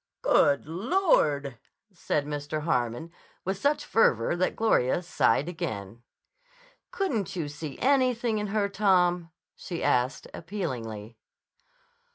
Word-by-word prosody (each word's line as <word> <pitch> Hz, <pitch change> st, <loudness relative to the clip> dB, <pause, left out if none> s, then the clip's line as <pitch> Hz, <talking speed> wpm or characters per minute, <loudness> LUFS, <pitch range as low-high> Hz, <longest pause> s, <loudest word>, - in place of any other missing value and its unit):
"Good 145 Hz, -1 st, +3 dB
Lord!" 160 Hz, -, +1 dB, 0.3 s
said 150 Hz, -4 st, -1 dB
Mr. 150 Hz, +1 st, -4 dB
Harmon 125 Hz, 0 st, -1 dB, 0.3 s
with 190 Hz, +1 st, -2 dB
such 290 Hz, +6 st, +1 dB
fervor 125 Hz, -, +2 dB
that 185 Hz, +1 st, 0 dB
Gloria 175 Hz, -, +2 dB
sighed 170 Hz, -3 st, +2 dB
again. 110 Hz, -, -5 dB, 0.9 s
"Couldn't 225 Hz, -, -2 dB
you 165 Hz, -4 st, -2 dB
see 145 Hz, -1 st, -7 dB
anything 250 Hz, -4 st, +2 dB
in 210 Hz, -, -2 dB
her, 205 Hz, 0 st, 0 dB
Tom?" 180 Hz, -4 st, +2 dB, 0.3 s
she 170 Hz, -2 st, -6 dB
asked 125 Hz, +2 st, +1 dB
appealingly. 120 Hz, -, -5 dB
170 Hz, 110 wpm, -27 LUFS, 140-205 Hz, 0.9 s, Good